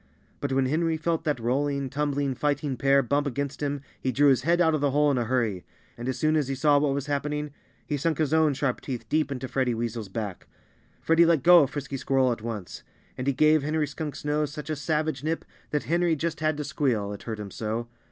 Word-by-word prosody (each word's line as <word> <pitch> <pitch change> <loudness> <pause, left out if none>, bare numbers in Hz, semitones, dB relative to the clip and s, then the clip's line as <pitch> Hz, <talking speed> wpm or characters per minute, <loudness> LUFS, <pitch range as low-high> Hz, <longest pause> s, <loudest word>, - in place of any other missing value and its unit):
But 140 - -3
when 135 0 +2
Henry 160 +4 +1
felt 165 +1 -1
that 150 -5 0
rolling, 140 +3 0
tumbling, 140 0 -1
fighting 145 0 -1
pair 135 +2 +3
bump 140 +4 0
against 140 +1 -3
him 145 -1 -2 0.2
he 130 - 0
drew 145 +3 +4
his 130 -2 +3
head 170 +5 +2
out 165 -2 +4
of 155 - 0
the 145 - +3
hole 145 +1 +3
in 130 - +1
a 120 - 0
hurry. 115 -6 0 0.3
And 120 +2 -5
as 130 - -2
soon 155 +4 +2
as 150 -4 +1
he 135 - -2
saw 145 +2 +4
what 140 -1 +1
was 140 -1 -2
happening 150 +1 -2 0.3
he 145 - -2
sunk 155 +1 0
his 155 -2 0
own 160 -3 +3
sharp 130 -2 -1
teeth 120 -4 -5
deep 155 -2 +1
into 130 -1 -4
Freddie 130 -2 0
Weasel's 115 -2 -4
back. 100 -2 -5 0.5
Freddie 165 +1 +4
let 165 -6 +3
go 175 -1 +8
of 140 - +1
Frisky 140 -1 -5
Squirrel 130 -1 +2
at 115 - -3
once. 110 -5 -6 0.3
And 130 - -5
he 140 - +3
gave 155 +3 +4
Henry 150 +2 0
Skunk's 145 0 -6
nose 150 -1 0
such 150 0 -6
a - - 0
savage 150 -1 -1
nip 160 +1 -2 0.2
that 150 - -1
Henry 170 0 +1
just 165 +2 -3
had 155 -1 0
to 150 - -2
squeal 125 -9 -1
it 100 - -8
hurt 110 -2 -5
him 100 -2 -6
so. 115 +3 -3
140 Hz, 235 wpm, -26 LUFS, 130-150 Hz, 0.5 s, go